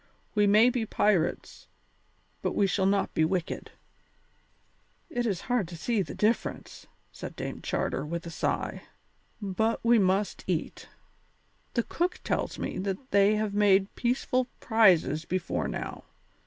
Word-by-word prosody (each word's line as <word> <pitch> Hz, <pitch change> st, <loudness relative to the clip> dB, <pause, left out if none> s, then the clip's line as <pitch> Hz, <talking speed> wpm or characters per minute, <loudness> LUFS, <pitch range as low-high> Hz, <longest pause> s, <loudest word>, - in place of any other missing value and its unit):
We 210 Hz, -1 st, +3 dB
may 215 Hz, +5 st, +6 dB
be 245 Hz, -2 st, -1 dB
pirates, 205 Hz, -5 st, 0 dB, 0.7 s
but -, -, -2 dB
we 200 Hz, -, +3 dB
shall 190 Hz, 0 st, +1 dB
not 195 Hz, 0 st, +1 dB
be 160 Hz, -, +2 dB
wicked." 175 Hz, +1 st, -2 dB, 1.4 s
"It 240 Hz, -5 st, -1 dB
is 195 Hz, -5 st, -1 dB
hard 245 Hz, -7 st, 0 dB
to 170 Hz, 0 st, -9 dB
see 225 Hz, +4 st, 0 dB
the 155 Hz, -, -5 dB
difference," 220 Hz, +2 st, -1 dB, 0.2 s
said -, -, -8 dB
Dame -, -, -5 dB
Charter, 135 Hz, -, -1 dB
with 170 Hz, +3 st, -4 dB
a 170 Hz, -, -6 dB
sigh, -, -, -2 dB, 0.6 s
"but 220 Hz, +2 st, 0 dB
we 235 Hz, 0 st, +5 dB
must 195 Hz, +1 st, +1 dB
eat. 175 Hz, -3 st, -3 dB, 0.9 s
The 235 Hz, -, +2 dB
cook 350 Hz, +8 st, -2 dB
tells -, -, -1 dB
me -, -, -4 dB
that 195 Hz, +6 st, -4 dB
they 200 Hz, +1 st, +5 dB
have 210 Hz, -1 st, -1 dB
made 200 Hz, -1 st, +3 dB
peaceful 250 Hz, +1 st, 0 dB
prizes 185 Hz, -, +4 dB
before 185 Hz, -1 st, -2 dB
now. -, -, -5 dB
200 Hz, 140 wpm, -28 LUFS, 185-225 Hz, 1.4 s, may